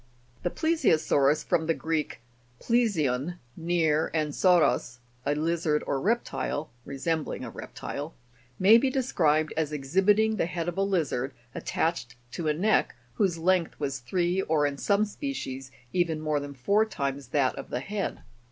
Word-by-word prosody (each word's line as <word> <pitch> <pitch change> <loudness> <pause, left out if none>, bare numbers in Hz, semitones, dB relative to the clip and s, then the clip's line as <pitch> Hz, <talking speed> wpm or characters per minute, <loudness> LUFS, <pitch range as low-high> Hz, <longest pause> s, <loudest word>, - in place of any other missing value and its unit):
The 175 - 0
PLEI'SIOSAU'RUS 160 - +2
(from 160 -1 0
the 165 - +2
Greek 160 -6 -2 0.4
plesion, 175 - +1 0.2
near, 160 -2 +1
and 155 -2 0
sauros, 155 -10 +3 0.3
a 145 - +2
lizard 155 -1 0
or 135 - -1
reptile 205 -8 -1
resembling 145 +1 -2
a 120 - -6
reptile 145 +6 -6
Jig. 120 -6 -23
82) 125 0 -32
may 215 +4 +9
be 270 - +1
described 160 - +1
as 155 -2 -1
exhibiting 195 +10 +2
the 165 - +1
head 170 -1 -3
of 175 +2 -2
a - - +3
lizard, 150 -9 0 0.2
attached 125 -7 -2 0.2
to 160 +3 -3
a 150 - +3
neck 210 +7 +2 0.2
whose 190 -5 +1
length 175 0 +1
was 140 -2 -2
three, 175 +8 0
or, 155 -4 +1
in 140 -1 -1
some 205 +1 +2
species, 200 - -5 0.2
even 170 -3 +1
more 155 -1 0
than 140 0 -7
four 200 +12 +3
times 140 - -3
that 130 0 +1
of - - -8
the - - -2
head. 200 +6 -3
160 Hz, 160 wpm, -27 LUFS, 140-190 Hz, 0.4 s, may